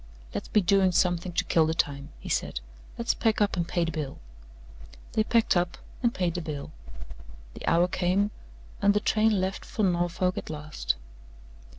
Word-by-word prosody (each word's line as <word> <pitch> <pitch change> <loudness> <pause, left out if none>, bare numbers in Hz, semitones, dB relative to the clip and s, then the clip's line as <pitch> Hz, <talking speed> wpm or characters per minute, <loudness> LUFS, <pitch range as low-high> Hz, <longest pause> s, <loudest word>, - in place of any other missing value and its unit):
"Let's - - -4
be 210 - +3
doing 190 0 +4
something 175 0 +1
to - - +1
kill 160 -2 +3
the 160 - 0
time," 140 -3 -1
he - - -10
said. - - -1 0.4
"Let's 235 0 +1
pack 225 -2 +1
up 205 -1 +2
and 170 -2 -1
pay 175 -1 +1
the 165 - -2
bill." 150 -3 -4 0.9
They 220 - +2
packed 230 -1 +3
up 175 0 +1 0.2
and 240 -2 +3
paid 180 -6 -1
the 175 - -3
bill. 150 -2 -5 0.8
The - - -8
hour 170 +2 +4
came, 185 +3 +1 0.5
and 200 0 +4
the - - +4
train 215 -1 +3
left 190 +1 -2
for 215 - -3
Norfolk 180 0 +1
at - - -9
last. 150 -1 -2
180 Hz, 180 wpm, -28 LUFS, 165-205 Hz, 0.9 s, doing